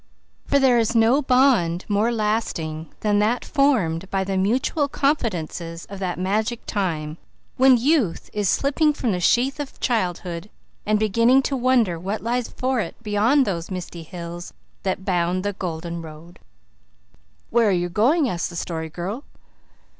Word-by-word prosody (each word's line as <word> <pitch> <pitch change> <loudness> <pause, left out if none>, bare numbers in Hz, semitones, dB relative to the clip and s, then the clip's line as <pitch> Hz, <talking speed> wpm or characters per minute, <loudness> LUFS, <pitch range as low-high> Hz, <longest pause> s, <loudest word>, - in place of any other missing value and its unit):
For 280 - +3
there 260 -3 +4
is 230 +1 0
no 230 +5 +4
bond 250 - +3
more 210 +3 +1
lasting 210 -8 -2
than 205 -1 +2
that 225 +4 +1
formed 195 - +1
by 195 -1 0
the 190 0 -3
mutual 250 +9 +1
confidences 175 - -2
of 200 - -7
that 185 -2 -3
magic 215 +6 -1
time 165 -6 -2 0.4
when 260 -1 +6
youth 250 - +1
is 205 -2 0
slipping 295 +2 +2
from 255 -6 -1
the 180 - -1
sheath 250 - +2
of 290 -2 -6
childhood 180 -4 -2 0.4
and 215 0 +3
beginning 230 +5 +3
to 275 - -1
wonder 240 -9 +2
what 195 +5 -4
lies 240 +1 -1
for 255 -1 -1
it - - -3
beyond 225 +6 +3
those 170 -5 -3
misty 180 -2 -6
hills 170 +1 -8 0.3
that 190 0 -3
bound 180 -1 0
the 205 - -1
golden 170 -2 -5
road. 160 +2 -12 1.1
"Where 235 -2 +4
are - - +3
you 175 -1 +1
going?" 255 - +2
asked 175 -6 -2
the 175 - -10
Story 160 -1 -4
Girl. 185 - -5
205 Hz, 155 wpm, -23 LUFS, 175-245 Hz, 1.1 s, when